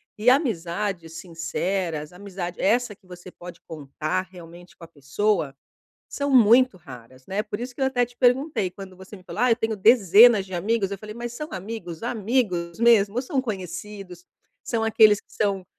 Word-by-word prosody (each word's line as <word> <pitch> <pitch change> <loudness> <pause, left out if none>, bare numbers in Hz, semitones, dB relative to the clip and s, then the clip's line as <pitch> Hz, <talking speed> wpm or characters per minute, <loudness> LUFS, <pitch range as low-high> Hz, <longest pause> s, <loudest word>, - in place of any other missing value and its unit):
E 220 +4 +3
amizades 195 - -1
sinceras, 165 -1 -4
amizade 180 -2 -7
essa 225 +1 +1
que 190 -2 -28
você 180 0 -12
pode 175 -1 -12
contar 155 +4 -4
realmente 175 0 -14
com 170 - -15
a - - -10
pessoa, 150 +1 -1 0.5
são 285 0 -3
muito 250 -1 +5
raras, 130 -6 -14
né? 195 +2 -2
Por 210 +1 -6
isso 250 0 -6
que - - -17
eu - - +3
até 245 -2 +1
te 240 0 -21
perguntei, 250 - +1
quando 185 0 -12
você 190 +2 -12
me 185 - -15
falou: - - -6
"Ah, 250 -1 +4
eu - - +5
tenho 225 -3 -2
dezenas 215 0 +6
de 190 - -11
amigos". 200 +2 -1
Eu 200 - -4
falei, 215 +2 -10
mas 240 0 -6
são 300 +5 -6
amigos, 185 -3 -7
amigos 210 -7 -1
mesmo, 230 0 +4
são 270 0 -2
conhecidos, 190 -3 -7 0.4
são 225 -2 -2
aqueles 215 -2 +5
que - - -24
são: 195 -3 -1
200 Hz, 180 wpm, -24 LUFS, 175-230 Hz, 0.5 s, dezenas